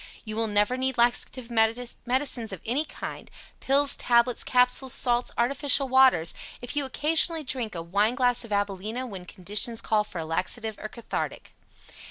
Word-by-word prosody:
You 215 -1 -6
will 225 0 +1
never 210 +4 +1
need 260 0 -1
laxative 240 +1 0
medicines 240 +2 0
of 190 - -7
any 265 +7 0
kind - - -8 0.3
pills, 280 +1 +2
tablets, 235 0 +2
capsules, 250 +1 +3
salts, 245 -1 +2
artificial 275 +3 +3
waters 255 -11 +4 0.3
if 245 +3 -6
you 290 -1 0
occasionally 315 +4 +2
drink 245 -6 -3
a 165 - -5
wine 205 +7 +1
glass 245 -1 +1
of 230 - -11
AbilenA 205 +4 -2
when 190 -5 -9
conditions 210 +5 -1
call 215 -1 +1
for 200 - -10
a 165 - -4
laxative 215 +7 -2
or 215 - -6
cathartic. 235 0 -6
240 Hz, 160 wpm, -26 LUFS, 215-260 Hz, 0.3 s, waters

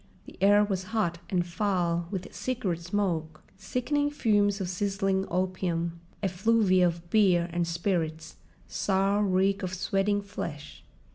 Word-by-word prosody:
The - - -12
air 205 +1 +6
was 190 -2 -2
hot, 170 -5 0
and 175 -2 +1
foul 175 -3 0
with 185 -2 -5
cigarette 200 -3 -2
smoke, 170 -4 -2
sickening 250 +9 -1
fumes 205 -7 +2
of 190 - -2
sizzling 195 +1 0
opium, 175 -2 -1 0.2
effluvia 190 -1 +3
of 170 0 -4
beer 185 -5 +4
and 175 -1 0
spirits, 170 -2 -2 0.3
sour 195 +1 +1
reek 195 +1 +2
of 185 -1 -3
sweating 200 +2 0
flesh. 150 -7 -7
190 Hz, 130 wpm, -28 LUFS, 175-205 Hz, 0.3 s, air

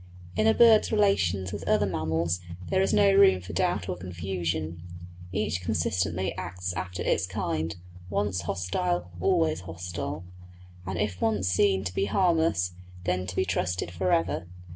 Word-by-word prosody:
In 215 - +2
a 220 - +5
bird's 230 -2 +6
relations 100 - +2
with 105 - -6
other 105 -1 +3
mammals 85 -1 -1 0.3
there 190 - +3
is 195 - +2
no 200 -1 +5
room 195 - +6
for 90 - -9
doubt 90 - 0
or 90 - -2
confusion; 85 -2 -3 0.5
each 95 -2 -1
consistently 90 +1 -1
acts 90 0 -4
after 90 +1 -4
its 90 +2 +1
kind; 85 -5 -2 0.3
once 100 -2 0
hostile, 90 0 -2
always 165 - +2
hostile; 90 -1 -5 0.6
and 95 -1 -3
if 95 -2 -2
once 105 -4 +1
seen 95 +1 +3
to 90 -2 -4
be 95 - +1
harmless, 160 - +2 0.3
then 90 0 -1
to 90 - -5
be 95 - +1
trusted 90 -1 -1
for 90 +1 -1
ever. 85 0 +1
90 Hz, 155 wpm, -27 LUFS, 85-100 Hz, 0.6 s, bird's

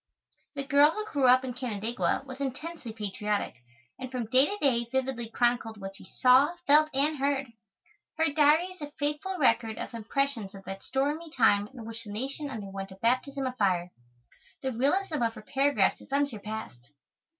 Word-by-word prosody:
The 275 - -3
girl 285 +1 +5
who 425 +6 -4
grew 285 -11 +1
up 255 +1 +6
in 250 - -4
Canandaigua 235 0 -1
was 260 0 -9
intensely 280 0 -5
patriotic, 210 -1 -2 0.5
and 255 - -5
from 250 -2 -3
day 255 +6 +4
to 410 - -3
day 240 -5 +2
vividly 260 -3 -2
chronicled 235 -2 0
what 195 0 -7
she - - -13
saw, 260 - +4
felt, 305 +2 +6
and 290 +2 +1
heard. 275 -3 0 0.6
Her 320 -2 +2
Diary 310 +4 +4
is 370 - -21
a 295 - -5
faithful 300 +6 -2
record 230 -7 +2
of - - -6
impressions 230 -2 -2
of 195 - -11
that 195 +1 -7
stormy 295 +5 -1
time 215 -7 +3
in 235 -1 -11
which 230 0 -7
the 210 - -9
nation 275 +7 -4
underwent 195 -5 -6
a 190 - -11
baptism 260 +4 0
of 255 -1 -3
fire. 180 -4 +1 0.7
The 265 - 0
realism 295 +6 0
of 230 -1 0
her 215 - -10
paragraphs 270 -5 +2
is - - -16
unsurpassed. 220 - -3
255 Hz, 175 wpm, -29 LUFS, 220-285 Hz, 0.7 s, up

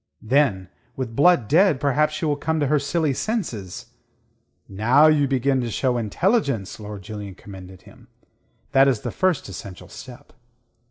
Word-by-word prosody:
"Then 110 -7 +1 0.3
with 125 -4 -5
Blood 155 -5 +4
dead, 165 - +3
perhaps 150 +2 +1
she 160 - -3
will 150 -1 +1
come 160 +2 -2
to 145 - +1
her 150 +2 +2
silly 150 +1 -1
senses." 125 - -4 0.7
"Now 120 +9 +3
you 150 -2 +4
begin 135 0 +1
to 120 - -3
show 125 +2 -1
intelligence," 125 - -1
Lord 105 -2 -8
Julian 105 -2 -8
commended 95 -2 -12
him. - - -18 0.6
"That 135 +1 +5
is 125 -6 +1
the 120 - -4
first 185 0 0
essential 95 0 -10
step." 125 -2 -12
130 Hz, 155 wpm, -22 LUFS, 105-150 Hz, 0.7 s, That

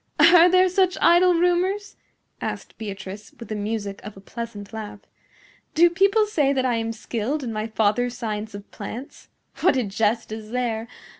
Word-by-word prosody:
"Are 335 +3 +8
there 370 +1 +5
such 370 0 +2
idle 350 +1 +5
rumors?" 360 +4 +1 0.5
asked - - -5
Beatrice, 205 0 -8
with 230 - -10
the 215 - -3
music 205 -1 -4
of 210 -1 -9
a - - -10
pleasant 210 0 -8
laugh. 210 -2 -7 0.7
"Do 340 +2 +6
people 395 +4 +3
say 300 -10 +1
that 260 -1 0
I 245 -2 +1
am 225 0 -2
skilled 235 +6 -3
in 235 -3 -4
my 215 +1 -3
father's 225 +3 0
science 215 -2 -4
of 200 0 -11
plants? 230 +6 -8 0.3
What - - +3
a 255 - +1
jest 215 +2 -1
is 215 -1 -7
there! 235 -2 -2
230 Hz, 170 wpm, -23 LUFS, 215-335 Hz, 0.7 s, Are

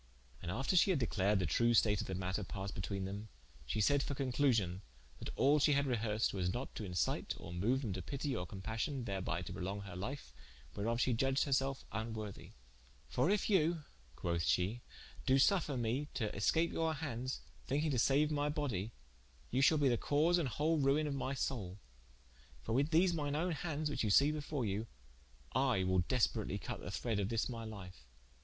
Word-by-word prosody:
And 85 - -5
after 135 - 0
she 180 - +6
had 185 - +3
declared 105 -5 +1
the 95 - 0
true 120 +9 +3
state 105 -2 +4
of - - -6
the 95 - -3
matter, 95 +2 -2
passed 95 +1 -5
betwene 95 +1 -3
them, 100 +3 -6 0.4
shee - - -1
sayd 140 +7 +4
for 140 - -3
conclusion, 125 -9 +1 0.4
that - - -6
all 145 +2 +4
that - - +1
she 150 - +5
had 140 0 +2
rehersed 110 -4 0
was 90 -2 0
not 125 +5 -4
to - - -5
incite 90 -3 -1
or 85 - -8
moue 105 +9 +1
them 120 -8 -3
to 95 - -4
pitie 135 - -3
or 90 -5 -3
compassion, 110 - -3
thereby 95 -4 -2
to - - -6
prolong 95 +2 -4
her 95 -3 -8
life, 100 - -5 0.4
whereof 115 +3 -1
shee 125 - +2
iudged 135 +3 +2
her 140 - 0
self 135 0 0
vnworthy: 110 -3 -5 0.6
"For - - +2
if 205 -1 +2
you 170 -5 +2 0.3
(quoth 85 -1 -1
she) 95 +9 +1 0.5
do 130 - +5
suffer 150 -1 +3
me 120 +5 -1
to 110 -4 -2
escape 160 +12 +2
your 160 -1 0
handes, 130 -4 -4 0.3
thinking 150 +3 +1
to 130 - +1
saue 140 +5 +4
my 145 0 +1
body, 120 -8 -2 0.6
you 130 - +2
shalbe 145 0 +5
the 120 -2 +3
cause 160 +8 +2
and 145 -6 0
whole 155 +5 +1
ruine 140 +2 +3
of 145 - -2
my 135 0 -2
soule, 105 -9 -3 0.9
for 110 - -2
with 140 +5 +2
these 175 +2 +4
mine 145 -3 -1
owne 175 +4 0
handes, 155 -1 -2
which 145 - -1
you 110 - +1
see 140 +8 +6
before 150 -4 -3
you, 105 +3 -2 0.7
I 95 - +2
will 95 0 +2
desperatly 115 +7 +1
cut - - -5
of - - -9
the - - -4
thred 115 -4 -1
of 100 0 -1
this 115 -1 0
my 115 -2 -5
life." 90 - -9
120 Hz, 200 wpm, -36 LUFS, 100-145 Hz, 0.9 s, she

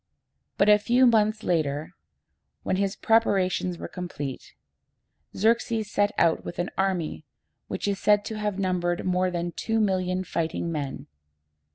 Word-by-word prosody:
But 200 - +3
a 210 0 +7
few 245 +4 +3
months 215 -2 +3
later, 155 -1 -1 0.7
when 185 - 0
his 195 +1 0
preparations 190 -6 +1
were - - -6
complete, 145 -7 -6 0.8
Xerxes 220 0 +1
set 205 0 +2
out 165 -1 +3
with - - -7
an 175 +1 -2
army 185 -5 -1 0.4
which - - -3
is 200 -1 -1
said 205 -1 +3
to 220 -1 -5
have 210 -2 -2
numbered 180 -2 -1
more 185 0 +1
than 175 -1 -3
two 225 +5 -1
million 185 -3 0
fighting 165 -1 -2
men. 145 -4 -4
185 Hz, 145 wpm, -26 LUFS, 175-210 Hz, 0.8 s, a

